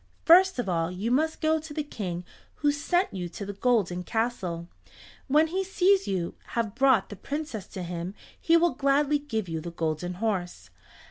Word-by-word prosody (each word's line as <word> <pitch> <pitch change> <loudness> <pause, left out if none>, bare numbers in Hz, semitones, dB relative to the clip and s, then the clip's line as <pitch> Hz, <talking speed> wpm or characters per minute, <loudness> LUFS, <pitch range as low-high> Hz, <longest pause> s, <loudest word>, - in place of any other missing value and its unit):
First 370 +1 +7
of 245 - -2
all 165 -2 0
you 195 +6 -3
must 315 +5 +1
go 315 0 +2
to 310 -1 -9
the 305 - -1
King 180 -10 -5 0.3
who 295 -1 +2
sent 350 +6 0
you 180 -2 -4
to 200 - -7
the 200 - -5
golden 200 -5 +1
castle. 185 -6 -2 0.6
When 300 +3 +5
he 370 +4 -1
sees 385 +1 +3
you 180 -3 -1 0.2
have 225 -3 0
brought 255 -4 +3
the 205 - -7
Princess 280 - -5
to 185 - -6
him, 175 +2 -5 0.3
he 335 0 +5
will 340 0 +3
gladly 290 +1 +2
give 225 -9 -3
you 165 -1 -3
the 170 - -6
Golden 165 +1 -3
Horse. 190 -3 -3
225 Hz, 185 wpm, -27 LUFS, 180-300 Hz, 0.6 s, First